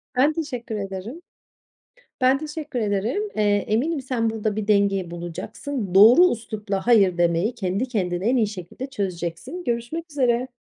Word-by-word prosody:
Ben 280 +5 +4
teşekkür 255 -8 -4
ederim. 200 - -6 1.0
Ben 260 +1 +4
teşekkür 300 -2 -5
ederim. 215 - 0
Eee, 215 - +1 0.3
eminim 280 +9 0
sen 250 -4 -1
burada 215 -1 -2
bir 215 -1 -3
denge 200 -4 +2
bulacaksın. 180 - -5
Doğru 240 - +8
üslupla 210 -3 -4
hayır 195 -7 +4
demeyi 175 +6 +2
kendi 195 +6 -2
kendine 185 -4 -1
en 255 - +3
iyi 220 -3 +3
şekilde 200 +6 -7
çözeceksin. 195 - -4
Görüşmek 245 +8 -3
üzere. 255 -3 +1
225 Hz, 140 wpm, -23 LUFS, 195-260 Hz, 1.0 s, Doğru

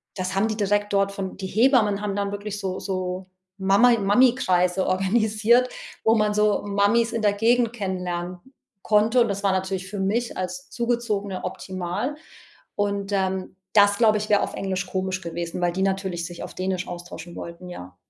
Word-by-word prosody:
das 185 -1 -3
haben 195 +3 +2
die 215 -1 -3
direkt 205 0 0
dort 195 0 +2
von 195 -2 -5
die 195 - -5
Hebammen 215 -2 +3
haben 205 -2 -2
dann 200 0 -1
wirklich 205 0 -5
so 190 -2 -3
so 185 -1 -3 0.3
Mama 200 +6 +5
Mami-Kreise 195 -4 +3
organisiert, 215 +5 +3 0.3
wo 220 - +4
man 210 -1 +2
so 210 -1 +3
Mamis 205 +4 +2
in 230 -1 -2
der 205 -1 +4
Gegend 230 +2 +2
kennenlernen 180 -4 -3 0.5
konnte, 215 +3 +3
und 235 - +2
das 200 0 -3
war 200 - +3
natürlich 190 0 -2
für 205 0 -5
mich 220 +5 -1
als 185 +10 -5
Zugezogene 230 -5 -2
optimal 185 +8 -4 0.6
und, 200 -1 -1
ähm, 190 -1 -1 0.2
das, 205 -1 +5
glaube 215 -2 +4
ich, 215 - -5
wäre 205 -1 +4
auf - - -2
Englisch 195 0 -2
komisch 185 0 -2
gewesen, 170 0 -5
weil 175 0 +2
die 190 - -2
natürlich 190 -3 -1
sich 175 0 -8
auf - - -8
Dänisch 185 -1 -2
austauschen 175 0 -8
wollten, 170 +1 -8
ja. 90 - -9
200 Hz, 175 wpm, -24 LUFS, 185-215 Hz, 0.6 s, Mama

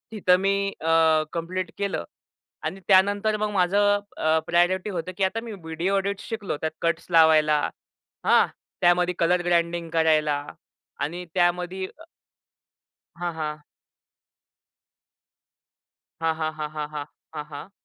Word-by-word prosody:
तिथं 185 -4 +3
मी 195 +1 +1 0.3
अ, 160 -1 +4
कंप्लीट 180 +2 -3
केलं. 200 - -2 0.6
आणि 165 +5 -3
त्यानंतर 205 +2 +4
मग 215 0 -1
माझं 205 +2 +3 0.2
अ, 160 0 +2
प्रायोरिटी 180 +3 +2
होतं 180 -2 -4
की 195 - 0
आता 190 +4 +1
मी 230 - -7
व्हिडिओ 165 +5 -1
एडिटस 200 +1 -2
शिकलो 215 -9 -3
त्यात 160 - -1
कट्स 170 0 -1
लावायला. 155 -2 +5 0.7
हां - - +6 0.4
त्यामध्ये 175 0 +4
कलर 175 +1 +3
ग्रँडिंग 170 -1 +1
करायला 155 -2 +3 0.7
आणि 175 +4 -6
त्यामध्ये 180 +1 +1
अ, - - -12 1.2
हां, 175 -1 -2
हां. 155 -1 -4 2.6
हां, 165 0 +2
हां. 155 0 -2
हां, 150 -1 -3
हां. 150 -1 -4
हां. 150 -1 -5 0.3
हां, 150 -1 -5
हां. 145 +6 -8
175 Hz, 130 wpm, -25 LUFS, 160-190 Hz, 2.6 s, हां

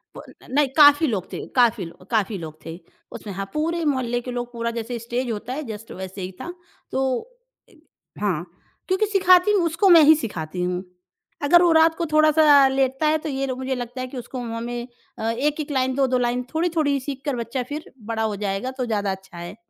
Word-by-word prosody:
वो - - -9 0.2
न - - -15
नहीं 290 0 +3
काफ़ी 290 +1 +7
लोग 200 -7 -3
थे। - - -5
काफ़ी 235 -6 +3
लो 170 +2 -13
काफ़ी 215 -2 0
लोग 155 -3 -8
थे 165 +1 -7 0.3
उसमें 205 - -8
हाँ, 195 +1 -4
पूरे 330 +2 -1
मोहल्ले 245 -4 0
के 250 - -6
लोग 245 0 -4
पूरा 235 0 -2
जैसे 235 +1 -4
स्टेज 240 +1 -3
होता 225 +4 -5
है 300 +2 -4
जस्ट 220 0 -8
वैसे 190 +1 -7
ही 185 +1 -5
था। 350 - -6 0.4
तो 265 - 0 0.7
इ - - -22 0.5
हाँ 180 -5 -1 0.4
क्योंकि 380 +3 +2
सिखाती 380 -1 +4
हूँ 400 -4 +3
उसको 335 +4 +2
मैं 335 -2 +9
ही 310 +2 +8
सिखाती 180 - -5
हूँ, 180 0 -2 0.6
अगर 345 +4 +6
वो 345 - +4
रात 320 0 +5
को 340 - -2
थोड़ा-सा 305 -2 +6
लेटता 265 +2 +1
है 310 +1 +3
तो - - -3
ये 275 -1 -2
लो 255 - -3
मुझे 260 +1 -3
लगता 245 +1 -6
है 255 - -4
कि 255 0 -9
उसको 250 +2 -6
मुँह 230 -1 -4
में 240 +1 -5 0.3
अ, 220 - -1
1-1 295 +5 -2
लाइन 260 -1 0
2-2 260 -2 +2
लाइन 245 0 0
थोड़ी-थोड़ी 315 -4 +1
सीख 270 0 -6
कर 285 -3 -1
बच्चा 240 +2 -3
फिर 300 +2 -6
बढ़ा 225 0 -2
हो 215 -2 -1
जाएगा 200 +4 -3
तो 255 - -1
ज़्यादा 205 -4 -1
अच्छा 190 -2 -9
है। 175 +3 -7
250 Hz, 215 wpm, -23 LUFS, 220-295 Hz, 0.7 s, मैं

